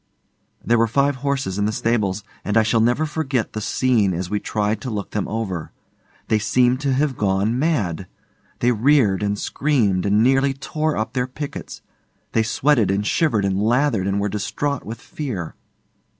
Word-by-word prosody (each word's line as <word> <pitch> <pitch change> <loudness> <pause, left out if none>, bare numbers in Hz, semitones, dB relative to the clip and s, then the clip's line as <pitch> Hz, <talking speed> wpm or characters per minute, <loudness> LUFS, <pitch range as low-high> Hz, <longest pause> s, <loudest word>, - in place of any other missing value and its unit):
There 120 0 +3
were 115 - +3
five 140 +4 +1
horses 135 -8 -2
in 100 - +1
the 105 - +1
stables, 105 -3 0 0.2
and 105 +2 0
I 110 - +5
shall 115 +1 +2
never 120 +7 +2
forget 145 -6 -2
the 110 - -4
scene 110 -5 +1
as 90 +2 -4
we 105 - 0
tried 105 +1 -1
to 130 - -4
look 105 -4 -4
them 105 - -2
over. 100 -7 -4 0.6
They 110 - +2
seemed 125 +3 +2
to 140 -2 +1
have 140 0 +1
gone 105 +4 0
mad. 100 - 0 0.5
They 125 - +4
reared 120 -4 +3
and 105 0 0
screamed 105 -10 0
and 105 +2 +3
nearly 135 +2 +3
tore 155 +3 -2
up 110 +2 -2
their 125 -1 0
pickets; 140 +3 -7 0.5
they 115 - +2
sweated 115 0 +2
and 100 +2 0
shivered 115 -7 +1
and 95 0 0
lathered 115 -3 +2
and 100 0 0
were 100 - 0
distraught 105 +8 -2
with 115 +2 -6
fear. 115 - -5
115 Hz, 180 wpm, -21 LUFS, 100-135 Hz, 0.6 s, I